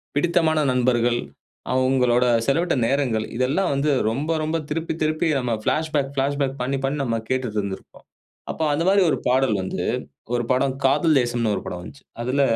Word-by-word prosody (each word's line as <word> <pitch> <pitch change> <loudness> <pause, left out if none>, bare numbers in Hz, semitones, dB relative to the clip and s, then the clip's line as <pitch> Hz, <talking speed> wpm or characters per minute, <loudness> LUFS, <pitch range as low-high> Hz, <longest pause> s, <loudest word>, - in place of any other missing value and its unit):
பிடித்தமான 160 0 +2
நண்பர்கள், 120 -1 +2 0.5
அவுங்களோட 130 -1 +3 0.2
செலவிட்ட 170 +5 +2
நேரங்கள், 125 -5 0
இதெல்லாம் 145 +9 +1
வந்து 140 +2 +1 0.2
ரொம்ப 140 +8 -2
ரொம்ப 155 +2 0
திருப்பி 165 +2 -2
திருப்பி 155 +2 0
நம்ம 125 -2 -1
பிளாஷ்பேக் 155 -3 0
பிளாஷ்பேக் 140 0 -1
பண்ணி 135 +2 -1
பண்ணி 140 +2 -1
நம்ம 115 -3 -1
கேட்டுட்டுருந்திருப்போம். 105 -7 -3 0.5
அப்போ 160 - -3
அந்த 155 +3 0
மாரி 200 +1 +4
ஒரு - - +1
பாடல் 130 -3 +2
வந்து 95 - -3 0.5
ஒரு 120 - 0
படம், 130 +1 +1
காதல் 150 +3 +3
தேசம்ன்னு 120 -3 0
ஒரு - - -4
படம் 90 - -5
வந்துச்சு. 115 +10 -12 0.2
அதுல 130 +4 0
135 Hz, 155 wpm, -23 LUFS, 120-150 Hz, 0.5 s, மாரி